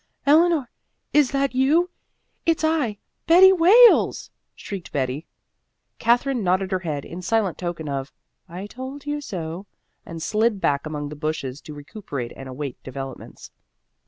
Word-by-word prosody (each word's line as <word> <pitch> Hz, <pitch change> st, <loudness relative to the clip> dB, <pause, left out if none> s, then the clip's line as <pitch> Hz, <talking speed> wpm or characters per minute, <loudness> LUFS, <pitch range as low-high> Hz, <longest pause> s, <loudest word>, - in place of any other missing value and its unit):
"Eleanor, 310 Hz, -2 st, +4 dB, 0.4 s
is 295 Hz, -4 st, +4 dB
that 275 Hz, -1 st, 0 dB
you? 305 Hz, +8 st, +2 dB, 0.5 s
It's 330 Hz, -1 st, +1 dB
I 305 Hz, -10 st, +1 dB, 0.3 s
Betty 370 Hz, +4 st, +8 dB
Wales!" 410 Hz, +8 st, +5 dB, 0.2 s
shrieked 195 Hz, -4 st, -8 dB
Betty. 135 Hz, +2 st, -2 dB, 0.7 s
Katherine 245 Hz, +1 st, +2 dB
nodded 185 Hz, +1 st, +1 dB
her 185 Hz, -, +1 dB
head 150 Hz, -6 st, -4 dB
in 175 Hz, +2 st, -8 dB
silent 200 Hz, 0 st, 0 dB
token 175 Hz, -3 st, -4 dB
of 135 Hz, -1 st, -4 dB, 0.4 s
"I 180 Hz, +4 st, -7 dB
told 260 Hz, +6 st, -8 dB
you 295 Hz, 0 st, -3 dB
so," 175 Hz, -, -6 dB, 0.4 s
and 165 Hz, -1 st, -8 dB
slid 215 Hz, +5 st, +1 dB
back 140 Hz, -3 st, 0 dB
among 145 Hz, -1 st, -4 dB
the 150 Hz, -, -8 dB
bushes 150 Hz, -3 st, -4 dB
to 150 Hz, -, -10 dB
recuperate 145 Hz, -, -7 dB
and 135 Hz, -1 st, -9 dB
await 130 Hz, 0 st, -6 dB
developments. 135 Hz, 0 st, -9 dB
195 Hz, 140 wpm, -23 LUFS, -, 0.7 s, Betty